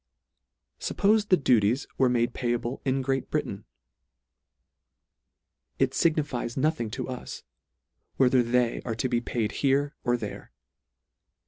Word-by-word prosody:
Suppofe 210 +1 +2
the 185 - +6
duties 120 -3 +2
were 130 -1 +5
made 120 -1 +1
payable 120 0 -2
in 135 0 0
Great 135 0 -1
Britain? - - -3 2.1
It - - +2
lignifies 145 -7 0
nothing 140 -5 0
to 130 +3 -5
us, 130 -1 -7 0.7
whether 130 -1 +4
they 120 0 +1
are 115 -3 -4
to 115 - -1
be 120 -2 0
paid 115 -3 -2
here 140 +1 +2
or 120 -1 +2
there. - - -7
125 Hz, 120 wpm, -27 LUFS, 120-140 Hz, 2.1 s, the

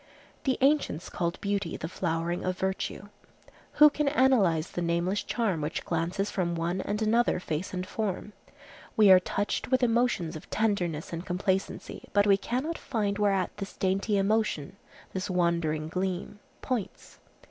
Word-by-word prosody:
The 265 -2 +2
ancients 275 - +2
called 170 -1 -2
beauty 200 -3 -1
the 160 - -4
flowering 170 0 -2
of 185 0 -1
virtue. 190 +1 -3 0.6
Who 300 0 +8
can 300 0 -1
analyze 235 - +3
the 175 - -3
nameless 170 +4 0
charm 205 -9 -1
which 150 +2 -3
glances 175 +4 -1
from 175 -3 -1
one 170 +3 -1
and 210 +3 -2
another 230 -1 +2
face 165 0 -3
and 185 0 -3
form? 210 0 -3 0.6
We 210 -3 +7
are 185 - +9
touched 205 +5 -2
with 260 0 +2
emotions 230 -8 +1
of 155 - -10
tenderness 180 -8 -1
and 165 +1 -4
complacency, 190 +1 -2
but 205 0 +4
we 200 -1 +5
cannot 260 +11 -2
find 210 -5 -1
whereat 195 -3 +1
this 195 -1 -6
dainty 195 +2 +1
emotion, 200 -6 0 0.4
this 190 +1 -3
wandering 170 -4 +1
gleam, 185 +3 -3 0.2
points. 245 -7 -4
190 Hz, 150 wpm, -28 LUFS, 170-215 Hz, 0.6 s, are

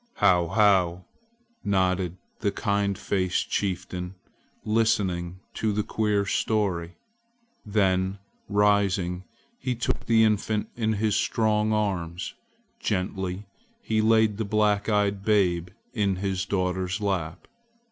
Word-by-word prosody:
"How! 90 -4 +4
how!" 95 -3 +3 0.6
nodded 95 -3 +1 0.2
the 100 -2 0
kind 100 -3 0
faced 95 -3 -1
chieftain, 90 -1 -2 0.5
listening 95 -5 0
to 110 - 0
the 105 +1 0
queer 105 -2 0
story. 95 -5 0 0.7
Then 95 -2 +1 0.3
rising, 100 -3 +2 0.3
he 125 -1 -2
took 120 - -2
the 115 -1 +5
infant 110 0 +1
in 110 -2 0
his 110 0 +1
strong 110 -1 +1
arms; 95 -5 -2 0.5
gently 95 +1 -2 0.4
he 110 -1 +1
laid 110 -1 +3
the 110 - -1
black 105 0 +1
eyed 100 -2 +1
babe 90 -5 +2 0.3
in 100 -5 +1
his 95 0 -2
daughter's 95 -1 -1
lap. 90 -6 -2
100 Hz, 110 wpm, -26 LUFS, 90-105 Hz, 0.7 s, the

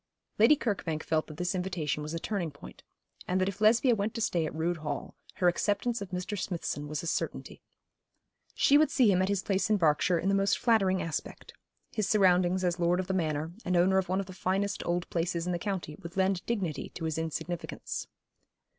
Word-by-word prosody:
Lady 230 +8 +7
Kirkbank 180 - -2
felt 155 -1 0
that 155 - -10
this 180 +2 -1
invitation 180 -5 -2
was 155 +2 -4
a - - -2
turning 185 -3 -2
point, 140 -1 -13 0.5
and 185 +1 +1
that 185 - +1
if 200 +1 -5
Lesbia 230 +4 +5
went 215 +1 -2
to - - -2
stay 170 -7 +1
at - - -7
Rood 165 +2 0
Hall, 150 -3 -5 0.2
her 180 - +2
acceptance 205 +6 +1
of 200 - -5
Mr. 180 +3 -3
Smithson 170 -6 -3
was 150 +1 -4
a - - -5
certainty. 170 - -3 0.9
She 285 +1 +5
would 310 - +4
see 240 -6 +4
him 185 -1 +3
at 190 - +1
his 200 -2 0
place 195 +1 0
in 215 - +4
Berkshire 165 +1 +3
in 165 - -2
the 195 - +3
most 195 0 +2
flattering 195 -6 +2
aspect; 165 -2 -5 0.4
his 215 -3 -1
surroundings 185 -2 +3
as 175 -1 0
lord 175 +1 +2
of 185 - -1
the 190 - -2
manor, 160 -3 -1
and 180 -1 +1
owner 190 +2 +4
of 185 - -3
one 190 +1 +1
of 195 - -2
the 185 - -10
finest 195 +2 -1
old 175 0 0
places 170 0 -1
in 180 - -1
the 175 - -1
county, 185 -6 -3
would 170 +3 -9
lend 190 -1 +1
dignity 195 -10 -2
to 165 - -4
his 160 0 -1
insignificance. 165 +1 -4
180 Hz, 215 wpm, -30 LUFS, 165-200 Hz, 0.9 s, Lady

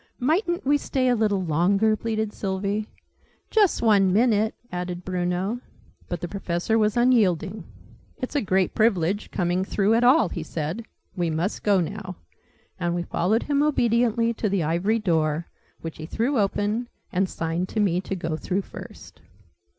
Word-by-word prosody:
"Mightn't 345 - 0
we 290 +2 +3
stay 260 -2 0
a 245 - +3
little 210 -4 +1
longer!" 195 +7 +2
pleaded 220 -1 -2
Sylvie. 200 +2 -2 0.6
"Just 415 - +3
one 200 -4 +4
minute!" 215 +1 +2 0.2
added 180 0 -4
Bruno. 185 +4 -1 0.5
But 175 - -3
the 175 - -3
Professor 180 +2 -1
was 215 +1 +2
unyielding. 215 -6 +2 0.5
"It's 255 +1 -5
a 290 - +3
great 190 -2 +1
privilege, 205 -3 +1
coming 180 0 0
through 200 +2 +1
at 230 +2 +3
all," 250 - +5
he 170 - -5
said. 160 +7 -4 0.3
"We 175 -3 0
must 165 +6 -2
go 200 -2 +3
now." 185 +1 -5 0.6
And 175 -1 0
we 175 - -1
followed 205 +6 0
him 285 -1 +1
obediently 235 -5 +2
to 215 -2 -1
the 195 -3 +1
Ivory 175 +8 +1
Door, 160 -5 0 0.4
which 165 -1 -6
he 155 - -7
threw 240 - 0
open, 205 +4 0 0.2
and 190 +1 +1
signed 165 +3 -2
to 220 - -2
me 185 -4 +2
to 195 - -4
go 165 -3 -3
through 190 +4 -2
first. - - -11
200 Hz, 160 wpm, -25 LUFS, 175-230 Hz, 0.6 s, all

